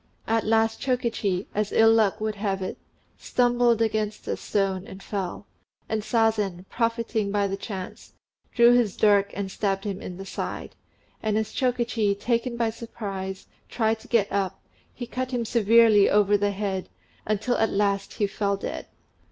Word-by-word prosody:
At 225 Hz, -1 st, 0 dB
last 225 Hz, 0 st, +2 dB
Chokichi, 230 Hz, -7 st, -1 dB
as 210 Hz, 0 st, -1 dB
ill 225 Hz, 0 st, +6 dB
luck 215 Hz, -2 st, +2 dB
would 215 Hz, 0 st, -1 dB
have 200 Hz, -2 st, -2 dB
it, 185 Hz, -, -5 dB, 0.4 s
stumbled 240 Hz, -2 st, +2 dB
against 215 Hz, -1 st, -2 dB
a -, -, 0 dB
stone 195 Hz, -2 st, -1 dB
and 190 Hz, +1 st, -10 dB
fell; 195 Hz, -1 st, -4 dB, 0.4 s
and 220 Hz, -1 st, -1 dB
Sazen, 215 Hz, -5 st, 0 dB
profiting 230 Hz, -3 st, -1 dB
by 205 Hz, 0 st, +1 dB
the 195 Hz, 0 st, -1 dB
chance, 195 Hz, -2 st, -7 dB, 0.4 s
drew 235 Hz, 0 st, +6 dB
his 235 Hz, -5 st, +2 dB
dirk 200 Hz, -1 st, +4 dB
and 195 Hz, -1 st, -3 dB
stabbed 195 Hz, -1 st, -1 dB
him 200 Hz, -2 st, -4 dB
in 180 Hz, -, -7 dB
the 195 Hz, -, -7 dB
side; -, -, -5 dB, 0.5 s
and 215 Hz, -1 st, 0 dB
as 220 Hz, -1 st, -2 dB
Chokichi, 240 Hz, -5 st, +1 dB
taken 235 Hz, +3 st, -1 dB
by 230 Hz, -1 st, +1 dB
surprise, 195 Hz, -5 st, -6 dB, 0.2 s
tried 220 Hz, -1 st, 0 dB
to -, -, -15 dB
get 220 Hz, -4 st, +2 dB
up, 195 Hz, -2 st, -1 dB, 0.3 s
he 245 Hz, -, -7 dB
cut 255 Hz, +2 st, -4 dB
him 245 Hz, -2 st, -2 dB
severely 225 Hz, -2 st, +5 dB
over 205 Hz, 0 st, +4 dB
the 205 Hz, 0 st, +2 dB
head, 195 Hz, -2 st, -3 dB, 0.4 s
until 215 Hz, +4 st, 0 dB
at 220 Hz, -, +2 dB
last 200 Hz, -1 st, 0 dB
he 210 Hz, -, 0 dB
fell 200 Hz, 0 st, -1 dB
dead. -, -, -5 dB
215 Hz, 165 wpm, -25 LUFS, 200-230 Hz, 0.5 s, ill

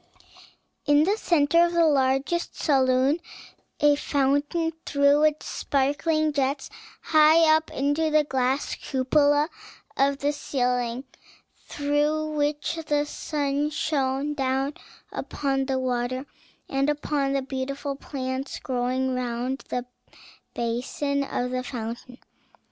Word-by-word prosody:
In 290 Hz, +1 st, +5 dB
the 395 Hz, +6 st, +2 dB
centre 335 Hz, -4 st, +3 dB
of 345 Hz, 0 st, +1 dB
the 340 Hz, -1 st, +4 dB
largest 275 Hz, +3 st, +1 dB
saloon 265 Hz, +1 st, +3 dB, 0.6 s
a 295 Hz, -1 st, +5 dB
fountain 285 Hz, +4 st, 0 dB
threw 280 Hz, +1 st, +3 dB
its 305 Hz, 0 st, +2 dB
sparkling 300 Hz, +3 st, 0 dB
jets 275 Hz, 0 st, -1 dB, 0.3 s
high 310 Hz, +1 st, +5 dB
up 315 Hz, 0 st, -1 dB
into 290 Hz, +4 st, 0 dB
the 305 Hz, 0 st, +4 dB
glass 265 Hz, 0 st, -1 dB
cupola 290 Hz, +2 st, +2 dB, 0.5 s
of 275 Hz, 0 st, +2 dB
the 285 Hz, +2 st, 0 dB
ceiling, 250 Hz, -3 st, -1 dB, 0.6 s
through 295 Hz, +2 st, 0 dB
which 295 Hz, +2 st, -1 dB
the 295 Hz, 0 st, +1 dB
sun 290 Hz, -1 st, -2 dB
shone 285 Hz, -2 st, -1 dB
down 270 Hz, 0 st, -1 dB, 0.4 s
upon 270 Hz, -1 st, -2 dB
the 265 Hz, -1 st, 0 dB
water 255 Hz, +1 st, -2 dB, 0.4 s
and 275 Hz, +1 st, 0 dB
upon 290 Hz, -2 st, -1 dB
the 275 Hz, -1 st, 0 dB
beautiful 275 Hz, +1 st, -4 dB
plants 265 Hz, -1 st, -4 dB
growing 255 Hz, +1 st, -1 dB
round 250 Hz, +1 st, -2 dB
the 250 Hz, 0 st, -2 dB, 0.7 s
basin 260 Hz, +4 st, -1 dB
of 250 Hz, -2 st, -3 dB
the 255 Hz, 0 st, -1 dB
fountain. 240 Hz, 0 st, -6 dB
280 Hz, 115 wpm, -25 LUFS, 260-295 Hz, 0.7 s, In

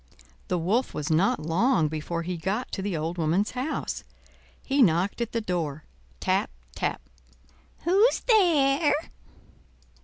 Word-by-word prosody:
The -, -, 0 dB
Wolf 200 Hz, +10 st, 0 dB
was 150 Hz, +1 st, -3 dB
not 165 Hz, +3 st, +3 dB
long 170 Hz, -, +2 dB
before 160 Hz, +2 st, -4 dB
he 180 Hz, +2 st, -3 dB
got 195 Hz, +8 st, -3 dB
to 195 Hz, -, -3 dB
the 190 Hz, -4 st, -2 dB
old 165 Hz, +3 st, -3 dB
woman's 170 Hz, +6 st, +1 dB
house. 260 Hz, +5 st, -3 dB, 0.6 s
He 275 Hz, +1 st, +1 dB
knocked 185 Hz, +2 st, +2 dB
at 235 Hz, -, -2 dB
the 230 Hz, -, -1 dB
door—tap, 145 Hz, -, -3 dB, 0.2 s
tap. -, -, -2 dB, 0.8 s
"Who's 400 Hz, +8 st, +4 dB
there?" 315 Hz, -, +4 dB
190 Hz, 125 wpm, -26 LUFS, 160-260 Hz, 0.8 s, Who's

